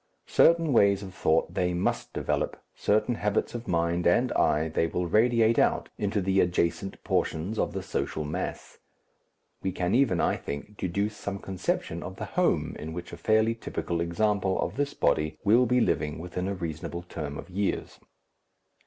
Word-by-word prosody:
Certain 165 -3 +4
ways 100 -3 +4
of 95 -2 -8
thought 80 -2 +1
they 90 -1 0
must - - -1
develop, - - -2
certain 110 +4 +1
habits 105 -2 -1
of 120 0 -6
mind 85 0 +1
and 120 +9 +3
eye 75 +2 +2
they 80 +1 0
will 90 +2 -2
radiate 115 +4 +3
out - - +2
into 100 0 0
the 95 +1 +2
adjacent 90 +2 0
portions 90 +8 -1
of - - 0
the - - -4
social 75 - -2
mass. 80 +5 -5 0.8
We 95 - -1
can 90 +1 -1
even, 120 -9 +3
I - - +2
think, 75 +9 -7
deduce 100 +3 -2
some 100 -1 -4
conception 95 -2 -3
of - - -7
the - - -5
home - - +1
in 80 +1 -6
which 85 +1 -7
a - - -3
fairly 110 +1 +3
typical 85 -6 -3
example 95 +2 +1
of 90 - -2
this 145 +1 -1
body 75 0 +1
will 120 +5 +5
be 125 +2 +3
living 75 -8 0
within 90 +2 -4
a 100 - -2
reasonable 85 0 -5
term 75 -4 -6
of - - -9
years. 100 +2 -2
95 Hz, 170 wpm, -28 LUFS, 85-110 Hz, 0.8 s, will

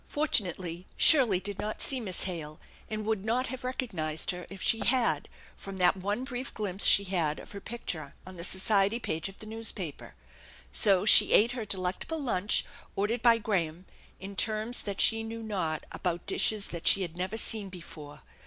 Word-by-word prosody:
Fortunately, 185 - -1
Shirley 245 - +6
did 200 +1 -6
not 215 +1 -4
see 265 - +1
Miss 195 -6 -2
Hale, 160 -5 -5 0.3
and 215 -1 -4
would 215 -3 -1
not 235 +4 0
have 260 0 -6
recognized 185 - -1
her 180 -1 -8
if 195 - -10
she 225 +5 +2
had 250 -1 +1 0.3
from 195 -1 -9
that 180 0 +3
one 205 +6 -3
brief 260 0 -6
glimpse 200 -3 +1
she 200 - +7
had 170 -6 -1
of - - -11
her 200 - -8
picture 165 -11 -6
on 185 0 -10
the 170 - -8
society 195 +3 +2
page 165 -6 -4
of 195 - -15
the - - -11
newspaper. 215 -8 -5 0.6
So 190 - +3
she - - +8
ate 230 +3 +5
her 240 -3 -5
delectable 190 - -3
lunch, 215 -8 +1 0.3
ordered 215 +4 -1
by 235 -1 +5
Graham, 185 -6 -2 0.3
in 195 +1 -8
terms 220 +4 0
that 200 -2 -5
she 225 0 +3
knew 225 0 -7
not, 180 -8 -2
about 175 -2 -3
dishes 205 +1 +1
that 170 -1 -5
she 195 - +4
had 170 -2 -6
never 185 +5 -3
seen 215 -3 0
before. 160 -5 -11
200 Hz, 180 wpm, -29 LUFS, 180-225 Hz, 0.6 s, she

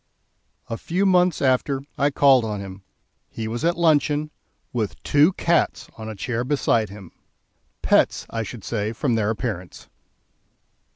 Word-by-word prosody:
A 115 - -5
few 185 +4 -1
months 180 -5 +3
after, 135 +1 +1
I 140 +1 +2
called 135 -3 +5
on 105 -2 -3
him; 95 0 -8 0.5
he 110 -1 -5
was 115 +4 -4
at 170 +1 +1
luncheon, 150 -2 +2 0.4
with 110 -5 -2
two 145 +5 +4
cats 170 -1 0
on 110 -1 -7
a 110 - -6
chair 115 +4 -2
beside 125 -5 +1
him 100 -3 -11 0.7
pets - - +2
I 115 - -2
should 110 -1 -7
say, 110 -1 -2
from 125 +1 -1
their 110 -2 +1
appearance. 105 -6 -5
125 Hz, 150 wpm, -23 LUFS, 110-150 Hz, 0.7 s, called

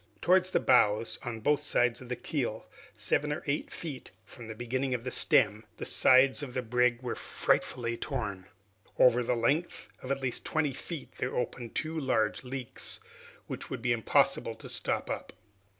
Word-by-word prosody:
Towards 185 +1 +4
the - - +2
bows, 105 +2 +3
on 115 -2 -5
both 145 +4 +2
sides 125 -4 +1
of 125 - -11
the 125 - -1
keel, 120 -3 -3 0.3
seven 150 +1 0
or 150 - -3
eight 145 0 -1
feet 145 -6 -7 0.2
from 120 -2 -11
the 110 - -6
beginning 130 +3 -1
of 120 - -5
the 125 - -3
stem, 105 -2 +3
the - - -5
sides 130 +2 +5
of 130 -4 -6
the 130 - -1
brig 125 +1 +2
were 120 - -2
frightfully 115 -1 0
torn. 105 -8 -4 0.5
Over 125 -1 +6
a 125 0 +1
length 140 +9 0
of 130 - -8
at 140 0 0
least 125 -2 -1
twenty 155 -3 0
feet 160 +2 -6
there 125 - -2
opened 120 -1 -3
two 160 +1 -1
large 110 -6 0
leaks, 130 -1 -4 0.5
which - - -6
would 125 -3 -5
be 120 -1 +3
impossible 115 -2 +2
to - - -11
stop - - 0
up. - - -5
125 Hz, 180 wpm, -30 LUFS, 115-140 Hz, 0.5 s, Over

